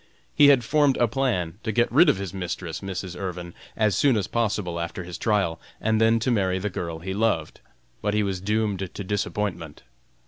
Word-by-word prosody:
He 145 - +6
had 135 -4 +6
formed 145 +2 +3
a 120 - +3
plan 105 -9 -1
to 110 - -2
get 120 +3 +1
rid 155 +6 +6
of 140 - +3
his 95 -3 -5
mistress, 90 -2 -4
Mrs. 95 -2 -5
Irvin, 90 -2 -5 0.2
as 105 -4 +2
soon 130 +2 +3
as 100 - 0
possible 105 -6 -1
after 85 +2 -4
his 85 0 -7
trial, 100 -7 0 0.2
and 110 0 +1
then 115 +1 +5
to 125 - +1
marry 95 -5 +1
the 100 +2 -3
girl 85 -2 -4
he 95 +4 -5
loved, 100 -7 0 0.4
but 105 0 0
he 105 - +2
was 95 -2 -2
doomed 105 -1 0 0.2
to 100 - -4
disappointment. 95 -5 -3
100 Hz, 200 wpm, -25 LUFS, 90-110 Hz, 0.4 s, He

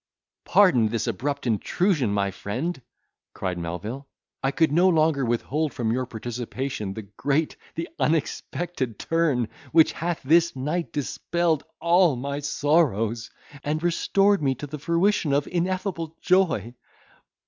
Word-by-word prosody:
"Pardon 170 - +5
this 115 +1 -2
abrupt 140 +5 -2
intrusion, 130 - +1
my 100 -1 0
friend," 130 - -4 0.5
cried 90 -2 -3
Melvil, 105 +11 -5 0.3
"I 135 - +1
could 160 +2 +2
no 175 +5 +5
longer 155 -4 +3
withhold 130 +5 -1
from 115 -2 0
your 125 +1 -1
participation, 120 -2 -4
the 110 - -6
great, 140 +10 -1 0.2
the 165 +1 -3
unexpected 150 - -1
turn, 155 -8 +1 0.2
which 160 -2 +6
hath 170 0 -3
this 165 +4 +4
night 155 +6 -2
dispelled 160 +2 -1
all 170 -2 +4
my 140 +3 -3
sorrows, 140 - +1 0.3
and 155 +2 -2
restored 195 +3 +2
me 135 -2 +1
to 145 - -6
the 150 +1 -7
fruition 170 0 +1
of 140 0 +2
ineffable 175 -2 -2
joy. 175 - +2
145 Hz, 130 wpm, -25 LUFS, 120-170 Hz, 0.5 s, which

